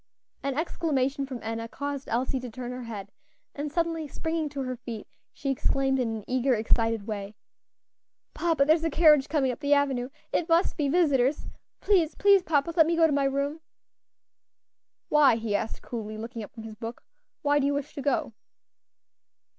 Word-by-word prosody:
An 275 -1 -2
exclamation 280 -4 0
from 255 -3 -7
Enna 225 +1 -3
caused 285 +2 -5
Elsie 255 +3 0
to 250 -1 -6
turn 245 +2 -6
her 250 -1 -6
head, 200 -3 -7 0.4
and 290 0 -4
suddenly 330 -1 -1
springing 320 +1 -2
to 280 -1 -4
her 255 0 -3
feet, 230 -3 -7 0.3
she 275 - -3
exclaimed 270 0 +1
in 245 -3 0
an 220 -2 -4
eager, 255 0 +2
excited 225 -1 +1
way, 205 -1 -5 1.0
"Papa, 325 -5 +2
there 310 +2 +6
is 325 - -4
a 325 - +1
carriage 305 -3 +5
coming 280 -4 +2
up 245 - -7
the 290 -1 +3
avenue 265 -3 0 0.2
it 335 - 0
must 335 +3 +3
be 290 -3 0
visitors; 285 -4 +2 0.4
please, 360 -6 +2
please, 400 -1 +5
papa, 315 -1 +1
let 320 -2 +6
me 335 - +2
go 330 0 +5
to 315 - +2
my 280 -1 +2
room." 280 +3 -1 1.5
"Why?" 295 -5 +6
he 225 -2 -2
asked 220 - -3
coolly, 215 -2 -5
looking 230 +1 -6
up 205 - -8
from 225 - -10
his 220 -1 -8
book, 225 +2 -7 0.4
"why 290 0 +3
do 280 - +2
you 285 - +1
wish 285 -1 -4
to 285 - -5
go?" 270 -4 0
275 Hz, 185 wpm, -27 LUFS, 235-300 Hz, 1.5 s, there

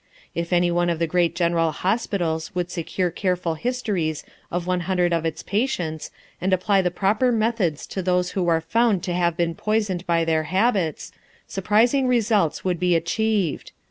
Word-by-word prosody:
If 170 +1 -3
any 175 0 +3
one 175 0 +1
of 170 - 0
the 165 - +1
great 170 0 +1
general 170 -2 +2
hospitals 180 -4 -1
would 175 -1 -2
secure 175 +1 -2
careful 180 -2 -1
histories 190 - -2 0.3
of 175 0 -3
one 180 0 0
hundred 180 -2 +2
of 165 -1 0
its 160 - -5
patients 180 - -2 0.3
and 190 - 0
apply 190 +2 +3
the 180 - +1
proper 210 +7 +1
methods 220 -9 0
to 190 - -2
those 180 0 +1
who 185 -3 -1
are 165 -1 +3
found 220 +2 +1
to 180 - -2
have 170 -1 +1
been 170 -1 0
poisoned 205 -3 -1
by 165 -1 +2
their 160 -1 +1
habits, 185 - 0 0.3
surprising 230 +7 +2
results 215 -10 +1
would 180 -2 0
be 180 -1 +2
achieved. 195 +1 -1
180 Hz, 175 wpm, -23 LUFS, 170-205 Hz, 0.3 s, any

